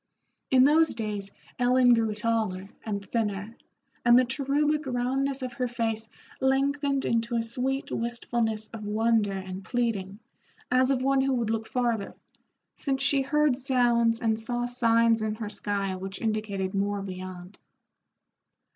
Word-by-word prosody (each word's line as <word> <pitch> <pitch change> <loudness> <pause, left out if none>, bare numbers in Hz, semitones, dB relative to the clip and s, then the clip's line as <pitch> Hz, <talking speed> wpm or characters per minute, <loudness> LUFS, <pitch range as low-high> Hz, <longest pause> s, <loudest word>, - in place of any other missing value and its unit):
In 260 -1 +6
those 310 +2 +4
days 210 -3 -3 0.3
Ellen 250 0 +5
grew 225 -2 +1
taller 210 -4 -1
and 200 -2 -4
thinner, 210 -1 -2 0.5
and 240 0 +7
the 255 - +5
cherubic 290 +3 0
roundness 265 +2 -1
of 250 -1 -4
her 250 +1 -1
face 225 -2 -2 0.3
lengthened 275 +1 +1
into 230 +1 0
a 230 - +1
sweet 260 +4 -2
wistfulness 230 -2 -1
of 220 -2 -7
wonder 215 0 +1
and 190 0 -6
pleading, 205 -4 -2 0.5
as 255 +1 +4
of 260 -2 +1
one 270 0 +3
who 270 0 +1
would 230 -3 -1
look 225 0 -2
farther, 235 -4 -1 0.6
since 270 -1 0
she 280 0 +3
heard 285 -1 +2
sounds 240 -3 +2
and 220 -2 +1
saw 240 +2 -1
signs 230 -2 +3
in 215 0 -1
her 215 -2 -5
sky 200 -2 -2
which 190 +1 -6
indicated 215 -4 -2
more 200 0 -1
beyond. 185 0 -8
230 Hz, 145 wpm, -27 LUFS, 210-255 Hz, 0.6 s, and